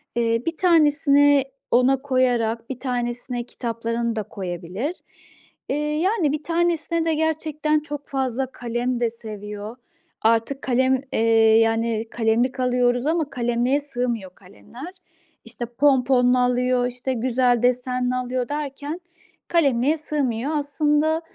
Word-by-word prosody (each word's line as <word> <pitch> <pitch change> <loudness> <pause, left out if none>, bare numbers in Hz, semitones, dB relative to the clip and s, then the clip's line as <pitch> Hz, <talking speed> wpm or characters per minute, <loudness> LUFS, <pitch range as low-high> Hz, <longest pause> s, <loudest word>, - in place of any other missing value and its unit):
Eee, 230 0 +1
1 330 -1 -2
tanesini 290 -4 +4 0.3
ona 255 +2 +3
koyarak 245 -4 0
1 255 - -5
tanesine 245 -1 -3
kitaplarını 230 -1 -3
da 215 - -2
koyabilir. 185 - -5 0.7
Eee, - - 0
yani, 305 +3 0
1 305 0 -3
tanesine 335 0 0
de 325 - +1
gerçekten 310 -1 0
çok 295 -1 -7
fazla 265 -1 -2
kalem 240 0 -2
de 235 - +2
seviyor. 210 -1 -8 0.5
Artık 230 +5 +1
kalem, 260 +1 +2
eee, 225 0 +4
yani, 225 0 +1
kalemlik 240 +3 +1
alıyoruz 245 0 +1
ama 320 -2 0
kalemliğe 245 +1 0
sığmıyor 240 -9 -4
kalemler. 235 - -12 0.5
İşte, 240 +1 -6
ponponlu 250 0 +3
alıyor, 250 0 +2
işte, 250 +1 -4
güzel 245 0 +1
desenli 250 0 +1
alıyor 255 0 -2
derken 295 +3 -4 0.5
kalemliğe 285 -2 +2
sığmıyor. 280 -4 -2
Aslında 300 +2 +1
250 Hz, 120 wpm, -23 LUFS, 235-290 Hz, 0.7 s, tanesini